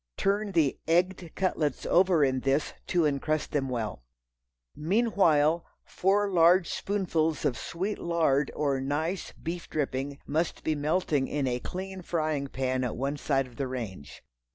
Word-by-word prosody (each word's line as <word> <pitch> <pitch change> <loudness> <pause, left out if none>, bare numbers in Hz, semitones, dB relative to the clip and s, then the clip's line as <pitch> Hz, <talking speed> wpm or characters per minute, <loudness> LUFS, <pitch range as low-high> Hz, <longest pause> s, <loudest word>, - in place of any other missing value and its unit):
Turn 200 +1 0
the 155 -6 +2
"egged" 175 +1 +1
cutlets 155 -7 -1
over 180 -3 +4
in 130 -1 0
this 135 +3 0
to 175 -2 +2
encrust 150 +1 0
them 135 -3 0
well. 110 - -3 0.7
Meanwhile 170 -4 +3 0.2
four 200 +2 +1
large 175 +1 +5
spoonfuls 165 -6 -1
of 125 - +2
sweet 190 - -3
lard 155 -5 +1
or 140 -3 0
nice 155 +7 -2
beef 170 +1 -6
dripping 140 -1 -2
must 160 +3 -1
be 155 - +1
melting 150 -2 0
in 145 -2 -1
a 125 -1 0
clean 190 +5 -6
frying 155 -5 -1
pan 130 -1 -1
at 125 - -3
one 140 +3 -2
side 135 -1 +1
of 125 -2 -16
the 135 - -1
range. 110 - -7
155 Hz, 150 wpm, -28 LUFS, 135-175 Hz, 0.7 s, large